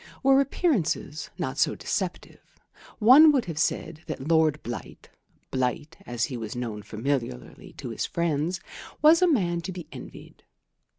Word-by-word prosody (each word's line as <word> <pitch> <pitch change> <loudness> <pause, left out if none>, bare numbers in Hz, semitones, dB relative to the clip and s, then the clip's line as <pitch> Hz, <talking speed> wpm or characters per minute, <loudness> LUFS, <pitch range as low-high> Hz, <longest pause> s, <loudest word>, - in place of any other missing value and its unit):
Were 270 +1 +6
appearances 215 - -1
not 130 +2 -3
so - - +2
deceptive, 190 -3 -4 0.6
one 270 +8 +8
would 270 -5 +1
have 165 -3 -5
said 160 0 -1
that 135 - -5
Lord 160 -2 +2
Blight 120 -1 -8 0.4
("Blight," 130 +5 -2
as 120 -1 -2
he 130 - -6
was 110 -1 -6
known 115 -4 -4
familiarly 115 - -4
to - - -7
his - - -3
friends) 170 +1 -1 0.4
was 320 +3 +7
a 365 - +5
man 175 - +1
to 190 - -5
be 180 -3 -7
envied. - - -11
160 Hz, 145 wpm, -26 LUFS, 130-205 Hz, 0.6 s, one